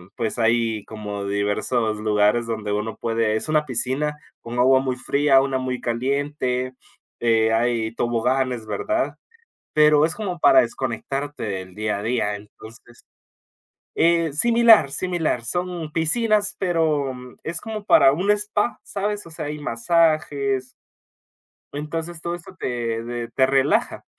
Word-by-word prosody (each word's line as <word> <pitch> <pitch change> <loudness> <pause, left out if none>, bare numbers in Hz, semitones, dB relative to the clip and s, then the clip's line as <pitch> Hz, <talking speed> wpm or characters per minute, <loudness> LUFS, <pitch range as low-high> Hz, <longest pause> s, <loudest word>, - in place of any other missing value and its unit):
pues 115 -1 -2
hay 115 -2 +1
como 105 -2 -6
diversos 105 +3 -1
lugares 105 +2 +2
donde 110 -2 -4
uno 105 +2 -2
puede, 115 -1 0
es 110 - -3
una 155 -1 +2
piscina 135 +4 -1 0.2
con 120 +1 -6
agua 130 +1 +5
muy 130 -2 -2
fría, 140 +1 +3
una 135 -1 -1
muy 130 -1 -3
caliente, 130 +1 -1 0.5
eh, 110 -1 +2
hay 115 -1 0
toboganes, 120 0 0
¿verdad? 320 - -1 0.6
Pero 150 0 +5
es 160 - -1
como 190 -5 -4
para - - +6
desconectarte 135 +4 -4
del 95 -3 -5
día 105 -1 -1
a - - -6
día, 110 -3 0
entonces, 110 +3 -14 0.9
eh, 170 -2 +2
similar 230 -3 +5
similar, 160 -6 -1
son 175 +2 -3
piscinas, 210 +5 +2
pero 160 -7 0 0.3
es 170 +2 -3
como 215 -2 -6
para 135 - +6
un 185 +7 0
spa, 210 +2 -1
¿sabes? 205 -1 -3
O - - -11
sea, 155 - -6
hay 150 +1 -5
masajes 145 -1 +1 1.1
entonces 160 +3 -5
todo 170 +1 -3
esto 175 +2 -11
te 115 -4 -3
te 120 0 -5
te 130 - +3
relaja, 135 +1 +1
130 Hz, 135 wpm, -22 LUFS, 115-160 Hz, 1.1 s, para